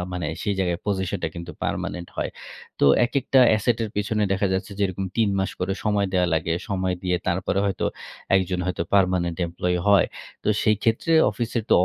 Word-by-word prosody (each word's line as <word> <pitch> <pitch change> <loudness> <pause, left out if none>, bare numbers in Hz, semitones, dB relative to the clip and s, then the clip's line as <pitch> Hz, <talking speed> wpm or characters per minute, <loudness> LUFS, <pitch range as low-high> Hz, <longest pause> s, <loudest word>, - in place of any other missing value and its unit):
মানে 90 -1 -3 0.2
সেই 105 -1 0
জায়গায় 90 -3 0
পজিশনটা 95 -3 -1
কিন্তু 85 0 -7
পার্মানেন্ট 85 -1 -3
হয়। - - -2 0.5
তো - - +4 0.2
একেকটা 135 +1 +2
অ্যাসেট 110 +2 +2
এর - - -4
পেছনে 105 +1 0
দেখা 95 +1 +1
যাচ্ছে 95 +3 -2
যে, - - 0
এরকম 95 +1 -4
৩ 115 -2 +3
মাস 95 - 0
করে 95 +1 0
সময় 105 -2 +2
দেয়া 90 -1 +3
লাগে। 80 +1 0 0.2
সময় 95 -2 0
দিয়ে 90 -1 +1
তারপরে 95 +1 0
হয়তো 95 -2 -1 0.5
একজন 95 -1 0
হয়তো 90 -2 -1
পার্মানেন্ট 90 -3 +2
এমপ্লয়ি 90 +1 -1
হয়। 100 -1 +6 0.4
তো - - 0
সেই 110 0 +3
ক্ষেত্রে 115 +9 +1 0.2
অফিসের 115 +2 -2
তো - - +7
95 Hz, 180 wpm, -24 LUFS, 90-105 Hz, 0.5 s, তো